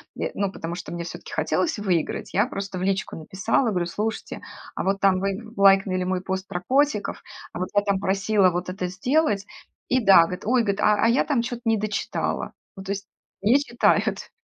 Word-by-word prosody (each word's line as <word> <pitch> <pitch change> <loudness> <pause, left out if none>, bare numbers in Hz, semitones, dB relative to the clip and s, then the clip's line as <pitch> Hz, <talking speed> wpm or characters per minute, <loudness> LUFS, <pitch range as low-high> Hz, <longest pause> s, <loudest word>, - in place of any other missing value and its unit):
е - - -3
ну, 200 -1 -1
потому 170 -2 -5
что 175 -2 -7
мне 170 0 -4
всё-таки - - -9
хотелось 325 -6 0
выиграть. 180 -6 -1
Я 205 +5 +3
просто 195 -6 -5
в 185 - -3
личку 195 0 -1
написала, 190 - 0
говорю: 180 -2 0
"Слушайте, 215 +5 -4 0.3
а - - -2
вот 195 +1 0
там 195 -2 +4
вы 200 +4 -4
лайкнули 195 -1 +4
мой 185 0 -1
пост 190 0 -4
про 180 -1 -4
котиков, 270 -5 +1 0.3
а - - -5
вот 185 - -2
я 205 - +5
там 200 -2 0
просила 195 0 +2
вот 175 +1 -3
это 185 -1 -3
сделать". 205 - +1 0.4
И 255 - +3
да, 195 -4 +8
говорит: 180 +3 -5
"Ой,- 245 +1 +3
говорит,- 200 -2 -1
а 210 0 +4
а - - +5
я 235 +3 +3
там 275 -6 +1
че-то 240 0 -5
не 225 -1 +3
дочитала". 210 0 -2 0.2
Ну 190 - -7
то 195 - -4
есть 200 0 -7 0.3
не 235 +8 +4
читают. 240 -4 +1
195 Hz, 205 wpm, -24 LUFS, 185-220 Hz, 0.4 s, да